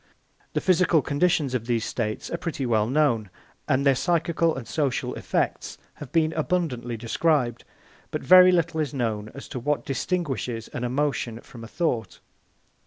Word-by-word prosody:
The - - 0
physical 175 -4 +3
conditions 145 -2 +1
of 120 -2 -2
these 115 -2 0
states 110 -3 -3
are 170 - -1
pretty 155 -6 -3
well 110 -3 +2
known, 125 -6 +1 0.4
and 135 +2 +1
their 140 - +6
psychical 165 +2 +1
and 135 -4 -7
social 145 -5 -1
effects - - -2 0.2
have 145 -4 -10
been 160 -1 +2
abundantly 145 -8 -1
described; 120 +1 0 0.4
but - - -4
very 185 0 +8
little 170 -2 +1
is 150 -2 -2
known 110 -4 -2
as 140 - -9
to 130 - -5
what 140 0 -1
distinguishes 135 - -2
an 120 - -5
emotion 125 -3 -1
from 115 -2 -12
a - - -8
thought. 115 - -2
140 Hz, 160 wpm, -25 LUFS, 120-165 Hz, 0.4 s, very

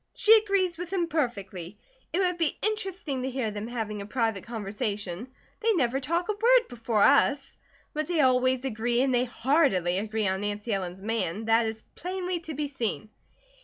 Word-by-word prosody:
She 440 +1 +7
agrees 395 -5 +1
with 355 0 -5
him 370 -3 +1
perfectly. 200 - -3 0.3
It - - -1
would 360 -2 0
be 325 -3 +1
interesting 385 -10 -2
to 260 - -2
hear 255 -4 -2
them 210 +1 -5
having 220 -4 -4
a - - -6
private 225 -4 -1
conversation. 205 -2 -4 0.3
They 455 -1 +2
never 270 - +1
talk 335 +6 -1
a - - +1
word 475 +4 +4
before 230 -3 0
us. 280 -1 +3 0.4
But 305 0 -2
they 340 -3 +2
always 255 0 +3
agree, 240 0 +1
and 265 -1 +1
they 245 0 +3
heartily 230 - +2
agree 215 0 -1
on 190 +1 0
Nancy 205 +2 -2
Ellen's 190 -1 -4
man, 220 -2 -2
that 225 0 +3
is 220 0 -5
plainly 360 0 -3
to 320 -2 -7
be 295 +1 -2
seen." 230 -5 -3
250 Hz, 180 wpm, -27 LUFS, 215-335 Hz, 0.4 s, She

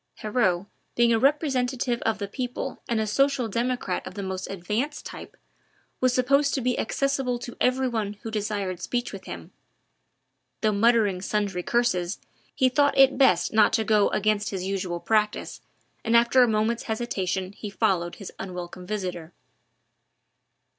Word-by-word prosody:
Heriot, 210 -5 0 0.3
being 235 -1 +4
a 225 - +3
representative 260 -3 +1
of 225 -1 0
the 200 -1 -4
people 250 +4 -5
and 230 -2 +1
a 220 - +1
social 275 +3 +1
democrat 235 -3 -2
of 185 - -9
the 200 - -4
most 190 -1 -4
advanced 210 - -3
type, - - -9 0.6
was 255 0 +3
supposed 275 +3 +2
to 270 - -1
be 250 0 0
accessible 270 0 0
to 240 0 -8
every 260 +1 +2
one 220 -4 -2
who 225 - -5
desired 200 -4 -2
speech 245 +2 -2
with 190 -1 -8
him. 85 -2 -8 1.1
Though 215 - +3
muttering 210 -3 +3
sundry 200 -2 -1
curses, 185 -5 0 0.4
he 260 - +4
thought 285 +2 +2
it 270 +1 +5
best 180 -11 +4
not 215 0 +5
to 225 -1 +2
go 210 -1 +3
against 210 0 +1
his 190 -2 -4
usual 185 -2 -2
practice, 215 +3 0 0.4
and 230 0 +4
after 235 +2 +5
a 245 - +6
moment's 220 +1 0
hesitation 190 -5 -2
he 205 +1 -7
followed 175 -3 0
his 200 - -9
unwelcome 180 -1 -7
visitor. 180 -5 -4
220 Hz, 155 wpm, -26 LUFS, 195-245 Hz, 1.1 s, a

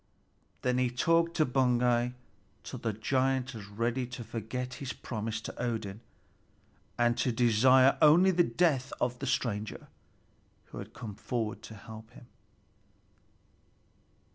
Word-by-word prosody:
Then 125 0 +1
he 125 -1 +2
talked 165 +7 +2
to 155 - +3
Baugi 125 -1 +2 0.5
till - - -7
the 115 - -1
giant 130 +4 0
was 105 -3 -8
ready 115 +4 -1
to 120 -1 -7
forget 125 +3 -5
his 135 -2 -4
promise 110 -1 -4
to - - -7
Odin, 110 -4 -3 1.0
and 120 0 +3
to 125 - +2
desire 125 +3 +5
only 165 +5 +7
the 180 -1 +3
death 150 -7 +1
of 125 0 -1
the 140 - -4
stranger 110 -4 -2 0.8
who - - -7
had - - -9
come 105 -3 -7
forward 110 0 -3
to 110 0 -10
help 110 +2 -11
him. 120 - -14
125 Hz, 135 wpm, -30 LUFS, 110-130 Hz, 1.0 s, only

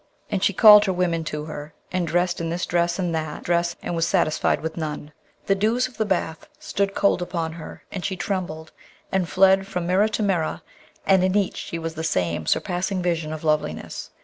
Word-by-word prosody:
and 195 -1 -1
she - - +4
called 210 +1 +8
her 190 - +1
women 175 -2 0
to 150 -1 -4
her, 150 -1 -8 0.2
and 180 -2 -1
dressed 175 +1 0
in 165 - -2
this 175 +2 -2
dress 170 0 0
and 180 -3 -1
that 155 -2 -3
dress, 170 0 0
and 175 - -3
was 165 0 +1
satisfied 170 -5 +1
with 160 +1 -5
none. 150 -2 -5 0.3
The 195 - +3
dews 220 +6 +1
of 255 - -17
the 220 - +1
bath 170 -4 -2
stood 200 0 -2
cold 200 -2 +2
upon 170 -2 -3
her, 165 -1 -10
and 185 - -5
she 195 -1 -2
trembled, 175 -5 -4 0.4
and 185 -3 0
fled 195 +1 +4
from 180 -3 -3
mirror 185 +4 +3
to 215 0 -2
mirror, 180 -6 0 0.4
and 190 -1 +4
in 185 +2 +2
each 200 -2 0
she 170 - -5
was 165 0 -4
the 160 0 -5
same 85 - -1
surpassing 185 0 0
vision 165 -3 -1
of 155 0 -6
loveliness. 150 - -2
175 Hz, 205 wpm, -23 LUFS, 160-195 Hz, 0.4 s, called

